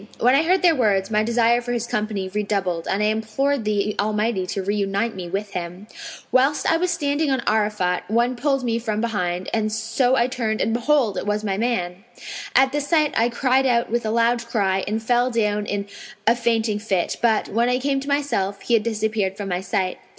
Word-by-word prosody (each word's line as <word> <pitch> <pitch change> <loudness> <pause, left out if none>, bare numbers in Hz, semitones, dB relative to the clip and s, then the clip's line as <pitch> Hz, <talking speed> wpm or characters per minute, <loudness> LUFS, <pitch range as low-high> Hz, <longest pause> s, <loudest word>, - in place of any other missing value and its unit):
When 245 +2 +4
I 275 - +5
heard 365 +4 +2
their 345 -2 +6
words, 205 -7 +1
my 210 0 +3
desire 235 +1 +2
for 245 0 -4
his 235 -1 -2
company 210 -4 -2
redoubled 195 -4 -2
and 200 +2 0
I - - +3
implored 220 +4 0
the 210 0 0
Almighty 210 -2 0
to 195 - -3
reunite 200 +2 -1
me 180 -2 -6
with 200 +3 -3
him. 180 +2 -6 0.5
Whilst 270 +3 +2
I 325 - +3
was 360 +2 0
standing 300 -3 0
on 265 -2 +1
Arafat,[FN#505] 210 -5 0
one 240 +3 +1
pulled 275 +1 0
me 230 -1 0
from 220 -2 -2
behind, 185 -6 -2 0.2
so 230 +4 +1
I 235 - +3
turned 235 -4 -2
and 225 - 0
behold, 240 -4 +1
it - - -6
was 210 +1 -1
my 195 -2 -1
man. 195 -5 -2 0.5
At 265 0 +5
this 290 0 -2
sight 305 -3 +2
I 230 +2 +3
cried 260 +2 +2
out 235 -2 +1
with 240 +1 0
a 215 - -2
loud 235 +1 +2
cry 195 -4 0
and 220 +2 -2
fell 245 +2 +2
down 210 -3 0
in 200 0 -2 0.4
a 230 - +4
fainting 225 -3 0
fit; 195 -5 -1
but, 225 -2 +2
when 235 +3 +1
I 250 - +2
came 275 +1 0
to 275 - -8
myself 280 -9 -1
he 240 - -1
had 230 - +5
disappeared 215 -3 -1
from 200 -1 -5
my 180 0 -1
sight. 185 -1 -2
220 Hz, 210 wpm, -22 LUFS, 205-245 Hz, 0.5 s, their